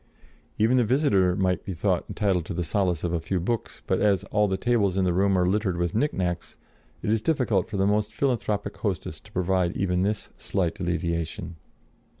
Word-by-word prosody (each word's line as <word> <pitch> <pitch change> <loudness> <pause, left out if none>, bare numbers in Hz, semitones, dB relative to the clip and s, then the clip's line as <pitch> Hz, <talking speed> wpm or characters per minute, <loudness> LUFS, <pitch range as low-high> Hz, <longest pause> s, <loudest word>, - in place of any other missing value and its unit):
Even 115 +4 +3
the 125 - +4
visitor 105 - +3
might 95 -1 0
be 95 - -4
thought - - 0
entitled 95 -5 0
to 95 - -5
the 90 - -1
solace 90 -2 0
of 85 -1 -1
a 85 - +1
few 90 +3 -2
books; 115 +6 -3
but - - +1
as 100 -3 +3
all 105 0 +3
the 95 -1 -1
tables 100 -4 +1
in 95 - +2
the 90 - +2
room 95 +1 +3
are 90 - +3
littered 95 -1 +1
with 85 -1 -1
knick 145 +7 +1
knacks, 90 -2 -3 0.5
it 105 - 0
is 110 -1 +2
difficult 120 - +1
for 105 - -3
the 95 - +2
most 105 +1 +1
philanthropic 110 -4 -1
hostess 80 - -3
to 105 - -19
provide 90 -1 0
even 90 -2 +1
this 105 +2 -2
slight 95 0 -1
alleviation. 85 -2 -2
95 Hz, 200 wpm, -26 LUFS, 90-105 Hz, 0.5 s, the